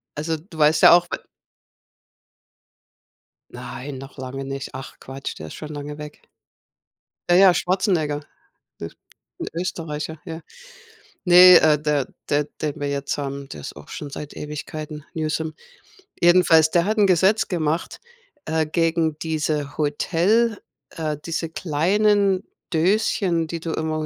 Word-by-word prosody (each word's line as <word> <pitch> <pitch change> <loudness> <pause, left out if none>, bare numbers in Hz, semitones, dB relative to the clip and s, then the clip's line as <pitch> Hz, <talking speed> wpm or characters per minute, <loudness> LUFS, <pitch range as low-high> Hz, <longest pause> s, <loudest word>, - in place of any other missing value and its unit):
also 160 +2 -2
du 160 +1 -15
weißt 150 0 +3
ja - - +10
auch 175 0 +5
w - - -1 2.4
Nein, 135 0 -7
noch 135 +2 -11
lange 135 +1 -6
nicht. 135 0 -5
Ach 135 - -9
Quatsch, 135 +1 -7
der 80 +1 -8
ist - - -10
schon 155 -1 -8
lange 145 0 -7
weg. 150 0 -10 1.1
Ja, 175 - +5
ja, 190 -2 +7
Schwarzenegger, 175 -6 0 0.6
Öst 80 - -7 0.5
'n - - -3
Österreicher, 160 -3 -4
ja. 165 -2 -7 0.8
Ne 180 0 +9
äh, 150 -2 +4
der 150 -3 0 0.2
der 145 0 +2 0.2
den 150 -2 -3
wir 145 - -1
jetzt 140 0 -2
haben, 140 -1 -5
der 75 - -8
ist 70 - -8
auch 75 - -12
schon 145 -2 -7
seit 150 +1 -8
Ewigkeiten: 150 0 -7
Newsom. 155 0 -2 0.7
Jedenfalls, 170 -3 +5
der 170 0 +3
hat 215 +1 0
'n 205 -2 +5
Gesetz 190 +4 +3
gemacht, 165 -2 -2 0.5
äh, 160 0 0
gegen 165 -1 0
diese 150 -2 -2
Hotel 185 +9 +1 0.3
äh, 155 -3 -3
diese 165 -1 -3
kleinen 195 +5 +2 0.3
Döschen, 175 -1 +1
die 165 +1 -5
du 165 0 -4
immer 160 0 -2
160 Hz, 140 wpm, -22 LUFS, 150-175 Hz, 2.4 s, ja